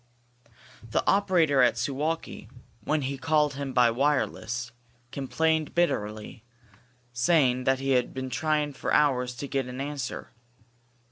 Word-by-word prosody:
The -, -, 0 dB
operator 175 Hz, -8 st, +3 dB
at 125 Hz, -, +3 dB
Suwalki, 150 Hz, +4 st, -3 dB, 0.4 s
when 150 Hz, -1 st, 0 dB
he 135 Hz, +1 st, -3 dB
called 150 Hz, -2 st, +2 dB
him 140 Hz, 0 st, -5 dB
by 125 Hz, -2 st, +4 dB
wireless, 125 Hz, -2 st, -1 dB, 0.4 s
complained 160 Hz, +3 st, -1 dB
bitterly, 110 Hz, -10 st, -1 dB, 0.7 s
saying 125 Hz, -1 st, +2 dB
that 130 Hz, 0 st, +3 dB
he 135 Hz, +1 st, -2 dB
had 125 Hz, -2 st, +2 dB
been 130 Hz, -1 st, -5 dB
trying 150 Hz, +1 st, 0 dB
for -, -, -4 dB
hours 125 Hz, -4 st, +2 dB
to 140 Hz, -, -6 dB
get 135 Hz, -2 st, -2 dB
an 125 Hz, +1 st, -7 dB
answer. 140 Hz, -4 st, -5 dB
135 Hz, 130 wpm, -27 LUFS, 125-150 Hz, 0.7 s, by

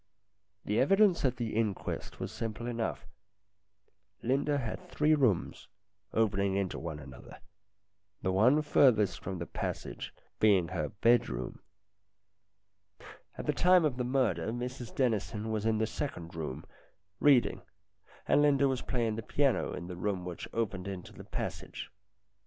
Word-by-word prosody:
The 105 Hz, -, +1 dB
evidence 195 Hz, +5 st, +4 dB
at 125 Hz, -1 st, +1 dB
the 115 Hz, -3 st, -3 dB
inquest 110 Hz, -4 st, -2 dB
was -, -, -4 dB
simple 115 Hz, +1 st, -4 dB
enough. 120 Hz, -2 st, -3 dB, 1.2 s
Linda 140 Hz, +4 st, +1 dB
had 140 Hz, +8 st, -5 dB
three 155 Hz, -1 st, +3 dB
rooms, 125 Hz, -, +1 dB, 0.4 s
opening 100 Hz, -3 st, +1 dB
into 95 Hz, -2 st, -1 dB
one 80 Hz, -2 st, -5 dB
another, 65 Hz, -4 st, -11 dB, 0.9 s
the 95 Hz, -, +1 dB
one 125 Hz, +11 st, +4 dB
furthest 105 Hz, -, +4 dB
from 95 Hz, 0 st, -5 dB
the 85 Hz, -, -4 dB
passage -, -, -5 dB, 0.3 s
being 95 Hz, -6 st, +4 dB
her 75 Hz, -, -2 dB
bed 115 Hz, +4 st, +3 dB
room. 60 Hz, 0 st, -5 dB, 1.8 s
At -, -, -5 dB
the -, -, +1 dB
time 180 Hz, -2 st, +5 dB
of 135 Hz, -5 st, 0 dB
the 125 Hz, -, 0 dB
murder 120 Hz, -10 st, +1 dB
Mrs 120 Hz, +1 st, -5 dB
Dennison 110 Hz, -3 st, 0 dB
was 110 Hz, 0 st, -1 dB
in 110 Hz, -1 st, +2 dB
the 110 Hz, -, +2 dB
second 105 Hz, -, -5 dB
room, 75 Hz, -5 st, -5 dB, 0.5 s
reading, 140 Hz, -4 st, +4 dB, 0.7 s
and -, -, +5 dB
Linda 140 Hz, -1 st, +4 dB
was 130 Hz, -2 st, -1 dB
playing 115 Hz, -4 st, -1 dB
the -, -, -2 dB
piano 140 Hz, +4 st, +1 dB
in 85 Hz, -, -6 dB
the 90 Hz, 0 st, -6 dB
room 95 Hz, -1 st, -2 dB
which 90 Hz, -2 st, -6 dB
opened 100 Hz, -5 st, -2 dB
into 95 Hz, -2 st, -7 dB
the -, -, -11 dB
passage. -, -, -5 dB
110 Hz, 145 wpm, -31 LUFS, 95-130 Hz, 1.8 s, time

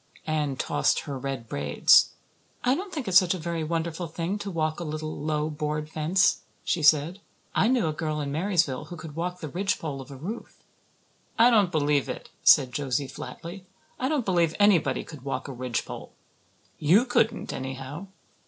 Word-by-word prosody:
Anne 150 Hz, -3 st, -1 dB
tossed -, -, +1 dB
her 140 Hz, -, -6 dB
red 130 Hz, -3 st, -4 dB
braids. 70 Hz, -4 st, +4 dB, 0.5 s
"I 250 Hz, -, +3 dB
don't 375 Hz, +6 st, -4 dB
think 290 Hz, -, -4 dB
it's 185 Hz, -1 st, +8 dB
such 185 Hz, -1 st, 0 dB
a -, -, -4 dB
very 165 Hz, -1 st, -3 dB
wonderful 165 Hz, +1 st, -2 dB
thing 170 Hz, +5 st, -3 dB
to 205 Hz, -1 st, -5 dB
walk 155 Hz, -3 st, -1 dB
a -, -, -3 dB
little, 155 Hz, 0 st, -4 dB
low, 150 Hz, 0 st, -1 dB
board 150 Hz, 0 st, -3 dB
fence," 170 Hz, +6 st, +2 dB, 0.2 s
she 175 Hz, -, 0 dB
said. 155 Hz, +4 st, +4 dB, 0.3 s
"I 215 Hz, -, +3 dB
knew 250 Hz, -6 st, +2 dB
a 155 Hz, -, 0 dB
girl 155 Hz, -1 st, -2 dB
in 140 Hz, -1 st, -3 dB
Marysville 165 Hz, -4 st, 0 dB
who 175 Hz, -, -8 dB
could 155 Hz, -2 st, -9 dB
walk 180 Hz, +2 st, -3 dB
the 155 Hz, -, -4 dB
ridgepole 165 Hz, -5 st, -2 dB
of 135 Hz, -, -12 dB
a 140 Hz, -, -9 dB
roof." 185 Hz, -, -8 dB, 0.7 s
"I 235 Hz, +2 st, +6 dB
don't 205 Hz, -6 st, +4 dB
believe 145 Hz, -3 st, +1 dB
it," -, -, -6 dB
said 130 Hz, -2 st, +6 dB
Josie 140 Hz, -2 st, -1 dB
flatly. 180 Hz, +7 st, -9 dB, 0.3 s
"I 260 Hz, -, 0 dB
don't 295 Hz, -6 st, 0 dB
believe 170 Hz, -4 st, +2 dB
anybody 180 Hz, -10 st, +3 dB
could 150 Hz, -5 st, -11 dB
walk 130 Hz, 0 st, -4 dB
a 135 Hz, -, -6 dB
ridgepole. 125 Hz, -1 st, -4 dB, 0.7 s
You 180 Hz, -, +5 dB
couldn't, 235 Hz, -2 st, +1 dB
anyhow." 135 Hz, +7 st, -6 dB
160 Hz, 180 wpm, -26 LUFS, 145-185 Hz, 0.7 s, it's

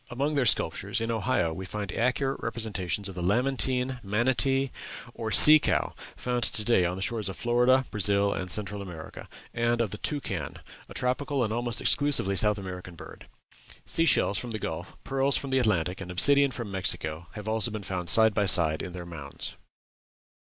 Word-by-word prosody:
Among 140 Hz, +5 st, -2 dB
their 135 Hz, -4 st, +1 dB
sculptures, 95 Hz, +3 st, -1 dB
in 115 Hz, +1 st, -2 dB
Ohio, 110 Hz, -7 st, 0 dB
we 95 Hz, -, -7 dB
find 100 Hz, 0 st, -6 dB
accurate 125 Hz, +4 st, -1 dB
representations 105 Hz, -4 st, -3 dB
of 95 Hz, -, -8 dB
the 90 Hz, -, -6 dB
lamantine, 125 Hz, +5 st, 0 dB
manatee, 130 Hz, +6 st, 0 dB, 0.4 s
or 110 Hz, -, -5 dB
sea 150 Hz, +9 st, +9 dB
cow -, -, -1 dB, 0.2 s
found 125 Hz, -1 st, -2 dB
to 110 Hz, -, -1 dB
day 105 Hz, -5 st, +2 dB
on 90 Hz, +1 st, -2 dB
the 95 Hz, -, -4 dB
shores 110 Hz, -4 st, -3 dB
of 95 Hz, -, -7 dB
Florida, 125 Hz, +2 st, +2 dB
Brazil, 100 Hz, -1 st, +2 dB
and 90 Hz, -, -5 dB
Central 105 Hz, +1 st, -3 dB
America 85 Hz, -5 st, -10 dB, 0.2 s
and 120 Hz, 0 st, 0 dB
of 115 Hz, -5 st, -1 dB
the 105 Hz, -, -7 dB
toucan, 100 Hz, -, -4 dB, 0.3 s
a -, -, -11 dB
tropical 130 Hz, +1 st, -1 dB
and 110 Hz, -1 st, -2 dB
almost 120 Hz, 0 st, +1 dB
exclusively 140 Hz, -9 st, +2 dB
South 105 Hz, +1 st, +4 dB
American 90 Hz, -2 st, -8 dB
bird. -, -, -13 dB, 0.6 s
Sea 165 Hz, -, 0 dB
shells 105 Hz, -8 st, +2 dB
from 125 Hz, -, -6 dB
the 110 Hz, -, -4 dB
Gulf, 85 Hz, -3 st, -6 dB
pearls 135 Hz, +1 st, 0 dB
from 140 Hz, -, -5 dB
the 130 Hz, -, +2 dB
Atlantic, 95 Hz, -6 st, 0 dB
and 95 Hz, -, -8 dB
obsidian 140 Hz, +10 st, +4 dB
from 120 Hz, -5 st, -7 dB
Mexico, 90 Hz, -4 st, -2 dB
have 105 Hz, -1 st, -9 dB
also 110 Hz, +1 st, +1 dB
been 110 Hz, -2 st, -6 dB
found 90 Hz, -3 st, -4 dB
side 110 Hz, +2 st, +5 dB
by 100 Hz, 0 st, 0 dB
side 80 Hz, -4 st, +5 dB
in 90 Hz, -, -7 dB
their 90 Hz, -1 st, -7 dB
mounds. 75 Hz, -5 st, -8 dB
110 Hz, 185 wpm, -27 LUFS, 95-125 Hz, 0.6 s, sea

